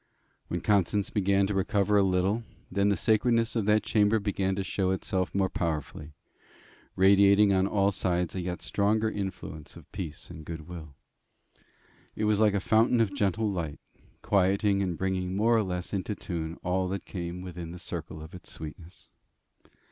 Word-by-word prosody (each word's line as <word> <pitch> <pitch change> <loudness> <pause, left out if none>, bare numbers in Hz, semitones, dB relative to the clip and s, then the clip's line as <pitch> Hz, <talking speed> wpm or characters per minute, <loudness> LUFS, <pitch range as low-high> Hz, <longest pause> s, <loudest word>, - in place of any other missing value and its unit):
When - - -3
Constance 100 0 +1
began 100 -1 +2
to 100 - -2
recover 100 +1 +1
a 100 - +6
little, 95 +3 +1 0.3
then 100 +2 +2
the 100 - +3
sacredness 115 +3 +2
of 110 -3 0
that 105 +1 +3
chamber 105 0 +3
began 95 -2 -1
to 100 - -2
show 95 0 -1
itself 95 0 -1
more 95 -1 +3
powerfully, 75 -3 -4 0.8
radiating 100 +1 +5
on 95 0 +3
all 100 -1 +2
sides 90 -3 -1
a 95 - -3
yet 90 0 -4
stronger 110 +2 +1
influence 95 -6 -6
of - - -15
peace 90 -6 -6
and 80 - -9
goodwill. 80 -2 -8 1.2
It - - -3
was 105 -1 +2
like 105 -2 +4
a - - +2
fountain 115 +4 +3
of 110 -4 +2
gentle 105 +2 0
light, 80 -6 -4 0.4
quieting 100 +1 +2
and 90 -4 -1
bringing 95 -1 -1
more 115 +4 +3
or 115 - +4
less 90 -1 -4
into 100 +2 -2
tune 85 -3 -5
all 90 +1 0
that 95 +1 -4
came 90 -1 -5
within 90 -2 -7
the 90 - -8
circle 80 -3 -6
of 80 - -12
its 90 - -10
sweetness. 80 +3 -10
95 Hz, 170 wpm, -28 LUFS, 90-105 Hz, 1.2 s, a